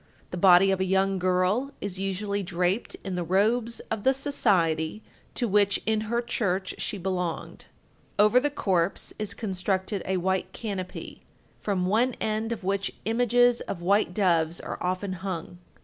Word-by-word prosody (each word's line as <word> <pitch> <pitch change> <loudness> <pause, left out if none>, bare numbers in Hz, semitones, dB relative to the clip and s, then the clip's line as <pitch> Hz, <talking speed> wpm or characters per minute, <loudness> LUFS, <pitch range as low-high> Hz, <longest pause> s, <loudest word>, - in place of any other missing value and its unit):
The - - -4
body 180 +1 +6
of 190 - 0
a - - +2
young 190 0 +1
girl 185 +9 +1
is 195 -2 -4
usually 200 +1 -2
draped 180 +3 -1
in 190 - -3
the 180 -1 -1
robes 220 +7 +1
of 220 -2 -2
the 265 0 +4
society 195 - +1 0.3
to 240 - 0
which 200 -1 +3
in 220 0 +1
her 235 +1 0
church 190 -5 -1
she 210 - -2
belonged. 180 -2 -3 0.5
Over 210 +4 +6
the 290 +3 0
corpse 190 -10 0
is 205 -2 -2
constructed 190 -1 -2
a 190 0 +1
white 190 +1 -1
canopy, 195 -5 -6 0.4
from 190 -3 -1
one 230 +6 +2
end 220 +1 -1
of 225 -4 -4
which 195 +1 -1
images 245 +2 +3
of 170 -3 -5
white 200 +1 +3
doves 170 -4 +1
are - - -6
often 185 +2 -2
hung. 175 -2 -5
195 Hz, 160 wpm, -27 LUFS, 185-215 Hz, 0.5 s, body